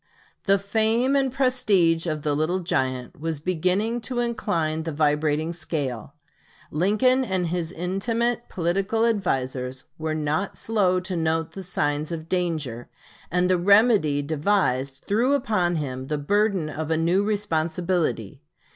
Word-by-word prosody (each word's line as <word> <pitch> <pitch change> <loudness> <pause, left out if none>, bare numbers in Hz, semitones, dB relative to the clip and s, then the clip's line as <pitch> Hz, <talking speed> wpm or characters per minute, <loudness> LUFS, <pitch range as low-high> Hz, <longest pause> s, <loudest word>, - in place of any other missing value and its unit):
The 195 0 +4
fame 220 +6 +1
and 270 -2 +2
prestige 215 -11 +2
of 155 -2 -2
the 150 -1 +1
"Little 165 +5 0
Giant" 130 - -2
was 160 -1 -3
beginning 185 +8 0
to 245 +1 -3
incline 170 -10 -1
the 160 0 -4
vibrating 150 +1 +1
scale. 140 -6 -4 0.6
Lincoln 215 - +3
and 185 -7 -1
his 170 -1 -2
intimate 225 +7 -1
political 195 +6 0
advisers 130 - -1 0.2
were 155 0 -2
not 155 +6 -1
slow 195 -5 +1
to 185 0 -4
note 160 -1 0
the 195 - -7
signs 150 -4 -1
of 160 -1 -5
danger; 155 -10 -2 0.4
and 180 +1 +2
the 185 -1 +2
remedy 200 -7 +4
devised 140 -4 0
threw 240 +7 +2
upon 205 -9 0
him 130 -4 -4
the 150 - -1
burden 195 +2 +1
of 155 +1 -4
a 160 - +2
new 175 +5 +2
responsibility. 170 - -1
175 Hz, 140 wpm, -24 LUFS, 155-205 Hz, 0.6 s, The